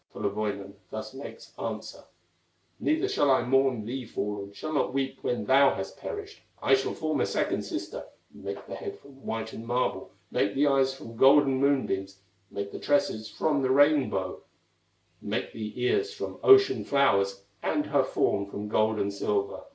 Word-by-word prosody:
Kullerwoinen 100 -1 -3 0.2
thus 110 +1 -6
makes 135 +1 -10
answer: - - -5 0.7
"Neither 325 +5 +1
shall 400 - +2
I 130 -2 +4
mourn 130 -3 +2
thee 130 +3 -4
fallen, 105 -3 -4
Shall 155 +9 -6
not 140 -2 0
weep 135 -1 -1
when 120 - -1
thou 135 +1 +5
hast - - -6
perished; 420 0 -7 0.2
I - - +2
shall 405 - +2
form - - -1
a - - +3
second - - 0
sister, - - -5 0.3
Make - - -7
the - - -8
head 410 -2 -6
from - - -16
whitened 115 -2 -5
marble, 125 +1 -1 0.2
Make 100 0 +1
the 140 +2 +3
eyes 135 -2 +3
from 115 -4 -10
golden 135 0 +6
moonbeams, 95 -9 0 0.3
Make 100 0 -5
the - - -7
tresses 110 -6 +1
from 145 +5 0
the 130 - +1
rainbow, 145 +1 +3 0.8
Make - - -3
the 110 +2 -6
ears 405 - +1
from 450 - -6
ocean 395 -1 +6
flowers, 100 -8 +2 0.2
And 150 -1 0
her 145 -2 +2
form 100 -5 0
from 105 +1 -6
gold 110 0 +2
and 100 -1 -1
silver. 100 0 -2
130 Hz, 165 wpm, -28 LUFS, 105-145 Hz, 0.8 s, golden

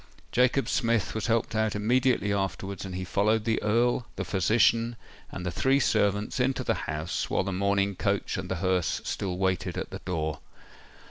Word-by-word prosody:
Jacob 125 +2 +3
Smith 115 -4 +1
was 110 - -2
helped 115 -1 +1
out 110 -1 0
immediately 120 0 +2
afterwards, 95 0 -3
and 95 -1 -6
he 95 - -3
followed 105 +4 +1
the 115 -1 +1
Earl, 120 +3 +1
the - - -3
physician, 115 +5 +2 0.4
and 90 - -6
the 90 - -1
three 135 +9 +2
servants 105 -1 +1
into 130 +1 +1
the 115 - +1 0.2
house, 80 +2 -2
while - - +1
the 95 0 -3
mourning 100 +1 +1
coach 100 +1 -1
and 95 0 -4
the 95 - -1
hearse 90 -2 +1
still 90 -3 -3
waited 95 -1 -1
at - - -4
the - - -6
door. 80 -4 -3
100 Hz, 180 wpm, -28 LUFS, 95-115 Hz, 0.4 s, Jacob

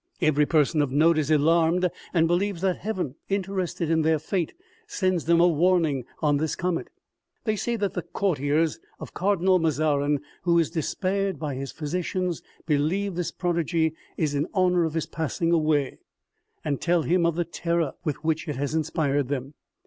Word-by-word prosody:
Hvery 150 -1 +2
person 155 -1 +3
of 145 -3 0
note 155 +3 +4
is 150 -1 -1
alarmed 165 +4 +3 0.2
and 165 -2 +3
believes 180 +1 0
that 190 -2 +1
heaven, 185 -10 -3 0.2
interested 190 -3 -2
in 160 -1 +3
their 160 0 +3
fate, 165 +3 -2 0.4
sends 185 - 0
them 170 +1 +4
a 175 - +6
warning" 165 -5 +2 0.2
in 145 -1 +3
this 155 +1 -1
comet. 180 -1 -2 0.6
They 215 -2 0
say 235 +3 -1
that 205 -3 -1
the 180 - -2
courtiers 160 - 0 0.2
of - - -9
Cardinal 185 -1 +2
Mazarin, 150 -2 +1 0.2
who 170 -1 +3
is 165 -2 +2
despaired 190 +4 -1
of - - -16
by 150 -3 -3
his 135 +1 -5
physicians 175 +2 -2 0.2
believe 170 +7 0
this 175 0 -2
prodigy 170 -2 0 0.2
is 150 -3 0
in 145 +3 0
honor 180 -2 +3
of 160 0 -3
his 165 - 0
passing 160 +1 -2
away, 155 -4 +1 0.7
and 145 -3 -1
tell 175 -2 +2
him 175 +2 +2
of 170 -1 +2
the 175 0 0
terror 170 -3 -1
with 150 -5 -3
which 160 +1 0
it 150 - -2
has 140 +3 -2
inspired 150 -3 0
them. 135 0 -4
165 Hz, 175 wpm, -25 LUFS, 150-180 Hz, 0.7 s, a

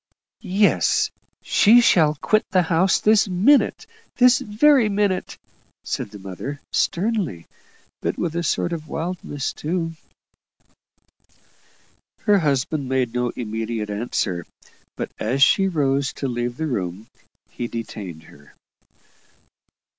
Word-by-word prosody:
"Yes; - - +3 0.3
she 225 +3 +5
shall 160 -10 +4
quit 215 +8 +1
the 185 -2 +3
house 170 +3 +2
this 215 0 +4
minute 220 - +3 0.3
this 250 +1 +5
very 230 +2 +3
minute," 200 -2 -1 0.5
said - - -4
the 105 - -11
mother, 100 +9 -7
sternly, 180 - -1 0.6
but - - -2
with 170 -2 -2
a 170 - 0
sort 170 +1 -1
of 155 -2 -6
wildness 160 -3 -4
too. 165 +1 -3 2.3
Her 205 -2 +3
husband 145 -2 -1
made 130 -3 0
no 125 0 0
immediate 110 -1 -4
answer; 100 -5 -2 0.5
but - - -4
as 130 +5 +2
she 195 +7 +4
rose 140 -5 0
to 135 - -4
leave 120 0 -3
the 160 - -2
room, 100 - -3 0.5
he 120 - -4
detained 100 -8 -7
her. 70 -2 -19
150 Hz, 115 wpm, -22 LUFS, 120-190 Hz, 2.3 s, she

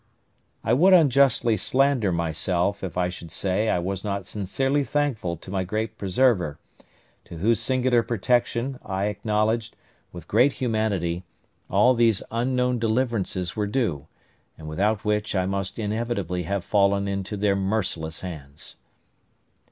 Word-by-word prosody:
I 115 - +2
would 180 +9 +5
unjustly 135 -8 +4
slander 130 -6 +2
myself 85 +4 -1
if 90 -2 -5
I 90 -1 +2
should 85 -2 -8
say 100 +5 0
I - - +2
was 95 +2 -3
not 100 -2 -3
sincerely 135 +9 -1
thankful 135 - -1
to 90 - -11
my 95 -1 0
great 110 +4 -3
Preserver, 95 - +1 0.7
to 85 - -10
whose 110 +7 +2
singular 130 -2 +2
protection 120 +3 0
I 95 0 -2
acknowledged, 110 +2 -1 0.4
with 85 -2 -10
great 125 +6 +4
humanity, 100 -8 -1 0.5
all 105 +7 +4
these 115 -4 +2
unknown 125 +1 0
deliverances 110 -6 -1
were 105 -1 -1
due, 90 - -1 0.5
and 75 - -10
without 100 +7 0
which 105 0 0
I 95 -1 +1
must 95 0 -3
inevitably 105 -5 -2
have 100 -2 -1
fallen 100 -1 +2
into 100 +1 -3
their 100 0 +2
merciless 95 -5 -2
hands. 75 -5 -8
105 Hz, 135 wpm, -25 LUFS, 90-120 Hz, 0.7 s, would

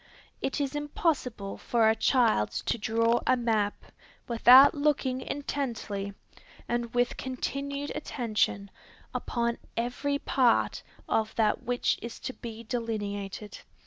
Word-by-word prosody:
It 270 - -1
is 280 -1 -1
impossible 285 - -1
for 230 -2 +2
a 220 - +4
child 225 - +3 0.2
to 235 - 0
draw 230 +2 +2
a 255 - +4
map, 220 -4 0 0.4
without 250 +3 +8
looking 285 -3 0
intently, 230 -9 -4 0.5
and 240 -1 -2
with 245 0 +1
continued 280 +2 -3
attention, 215 -8 -1 0.4
upon 235 -1 -1 0.2
every 250 +5 -1
part 255 -4 +2 0.3
of 220 0 0
that 215 -2 +2
which 245 0 0
is 235 - -7
to 260 - -4
be 230 -2 -8
delineated. 210 -3 -4
235 Hz, 115 wpm, -28 LUFS, 220-265 Hz, 0.5 s, without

